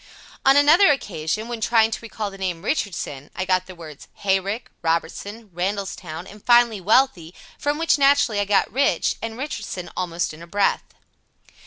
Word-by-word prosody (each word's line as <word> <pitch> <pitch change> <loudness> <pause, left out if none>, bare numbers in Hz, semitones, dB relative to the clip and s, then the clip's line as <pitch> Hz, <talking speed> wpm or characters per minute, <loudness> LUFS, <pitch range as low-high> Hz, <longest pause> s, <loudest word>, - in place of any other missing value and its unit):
On 270 +1 +6
another 310 +6 +6
occasion, 210 - -2
when 235 -2 -5
trying 225 0 +3
to - - -3
recall 220 -3 -5
the 195 - -11
name 180 -1 -3
"Richardson," 175 - -3
I 185 - -2
got 185 0 +1
the 185 - -10
words 155 -4 -11
"hay 195 -1 +1
rick," 200 +5 -5
"Robertson," 200 +6 -3
"Randallstown," 180 -2 -4
and 210 +1 -14
finally 240 -4 +4
"wealthy," 195 -5 +2 0.2
from 290 +1 -1
which, 325 -2 +2
naturally, 275 -6 +4
I 205 - +1
got 200 0 +1
"rich" 265 -10 +1
and 225 0 -5
"Richardson" 215 -9 -5
almost 175 -2 -2
in 155 - -12
a 170 - -10
breath. 200 +3 0
205 Hz, 170 wpm, -22 LUFS, 180-235 Hz, 0.2 s, On